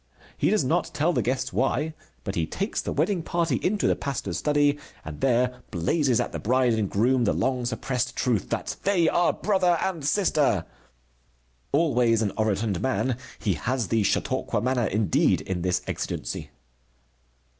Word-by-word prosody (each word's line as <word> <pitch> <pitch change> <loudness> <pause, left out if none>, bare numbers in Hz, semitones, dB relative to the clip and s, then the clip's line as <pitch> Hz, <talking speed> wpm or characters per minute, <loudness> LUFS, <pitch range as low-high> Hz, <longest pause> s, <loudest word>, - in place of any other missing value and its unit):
He - - +1
does - - +2
not - - +1
tell 165 +4 +2
the - - +1
guests 130 0 -2
why. 150 +4 0 0.3
But - - -3
he 80 -2 -1
takes 200 - -2
the - - -4
wedding 195 -4 +1
party 165 -4 0
into 205 +1 0
the - - +3
pastor's 120 -10 -3
study 145 -1 +2 0.3
and 75 -2 -8
there 125 -1 +1
blazes 120 - +1
at - - -1
the - - -4
bride 125 +1 +2
and 110 -3 0
groom 120 +4 +2
the - - +2
long 130 -2 0
suppressed 125 -1 -2
truth 120 -6 0
that - - -3
they 190 -4 +2
are 175 - +3
brother 185 -4 +2
and 170 -4 -2
sister. 145 - +2 1.1
Always 125 -7 +3
an 100 - 0
orotund 105 -3 0
man, 130 -1 0 0.2
he 100 - 0
has 120 - -2
the 115 -1 +2
Chautauqua 105 - 0
manner 125 0 +1
indeed 105 -4 +2
in 95 -2 -3
this 90 0 0
exigency. - - -4
125 Hz, 165 wpm, -26 LUFS, 110-150 Hz, 1.1 s, the